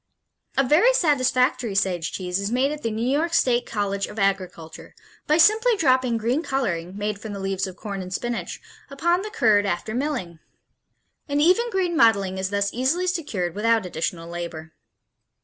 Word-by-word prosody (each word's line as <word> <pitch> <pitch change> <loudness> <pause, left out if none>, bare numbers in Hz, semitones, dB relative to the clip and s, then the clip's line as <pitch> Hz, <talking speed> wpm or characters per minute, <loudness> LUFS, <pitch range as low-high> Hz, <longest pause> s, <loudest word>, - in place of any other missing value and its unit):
A 270 - +4
very 350 - +4
satisfactory 255 - +1
Sage 185 -4 0
cheese 180 0 -3
is 200 +2 -3
made 260 +4 +1
at 300 0 -6
the 230 - -1
New 225 +2 -2
York 320 +5 +1
State 245 -5 +2
College 200 -2 -2
of 210 - -11
Agriculture 185 -5 -3 0.3
by 305 - +3
simply 435 +7 +4
dropping 255 -6 +2
green 240 +7 0
coloring, 190 - -2
made 205 0 -3
from 215 -2 -6
the 200 - -6
leaves 195 0 -2
of 185 - -9
corn 200 -2 -6
and 185 0 -8
spinach, 240 +5 -4 0.3
upon 345 +6 +1
the 425 - -5
curd, 215 - +3
after 175 +4 -3
milling. 245 - -3 0.9
An 285 0 0
even 370 +10 +3
green 370 -5 -1
mottling 200 -8 +3
is 190 0 -2
thus 200 0 -1
easily 270 +9 0
secured 290 - -2
without 225 0 +1
additional 165 -1 -4
labor. 170 -2 -7
225 Hz, 170 wpm, -23 LUFS, 195-290 Hz, 0.9 s, A